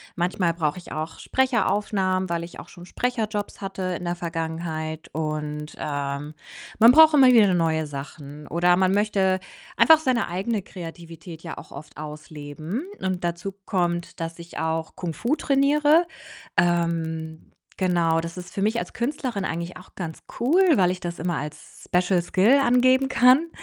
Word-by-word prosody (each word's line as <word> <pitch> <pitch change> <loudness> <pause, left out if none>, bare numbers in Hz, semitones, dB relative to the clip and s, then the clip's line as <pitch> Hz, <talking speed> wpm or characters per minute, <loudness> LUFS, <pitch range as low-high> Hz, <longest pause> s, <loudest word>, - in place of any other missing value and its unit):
Manchmal 175 -1 0
brauche 155 -1 -1
ich 175 - -11
auch 155 +2 -5
Sprecheraufnahmen, 200 -7 0
weil 170 0 -1
ich 170 - -10
auch - - -11
schon 175 0 -12
Sprecherjobs 220 -2 -3
hatte 195 -1 -5 0.2
in - - -9
der 175 0 -1
Vergangenheit 160 -1 -4
und, 150 -1 -4
ähm, 145 +1 -4 0.4
man 230 +3 +8
braucht 315 +1 +7
immer 265 -2 +7
wieder 220 -4 +6
ne 185 - +2
neue 160 -2 +1
Sachen, 145 +1 -9
oder 175 +1 +3
man 190 0 +3
möchte 195 -2 +2 0.4
einfach 320 -1 +7
seine 255 -6 0
eigene 195 +4 -2
Kreativität 165 -2 -10
ja 165 - -7
auch - - -11
oft 150 +2 -11
ausleben 155 - -6 0.2
und 185 -2 -2
dazu 175 +3 -3
kommt, 175 -3 -1
dass 165 0 -5
ich 170 0 -9
auch 160 0 -2
Kung 170 -3 -4
Fu 260 +6 0
trainiere. 295 +4 +3 0.5
Ähm, 165 -2 -1 0.3
genau, 170 -3 +2
das 170 +2 -7
ist 180 - -9
für 195 - -3
mich 220 +3 +1
als - - -6
Künstlerin 245 -5 -2
eigentlich 170 +2 -4
auch 180 - -17
ganz 165 -4 -6 0.2
cool, 315 +11 +3
weil 180 -1 +3
ich 185 - -5
das 175 -1 -5
immer 175 -2 -1
als 150 +1 -8
Special 180 0 +2
Skill 205 +10 +4
angeben 255 +2 +4
kann 260 +7 +5
175 Hz, 165 wpm, -24 LUFS, 160-210 Hz, 0.5 s, man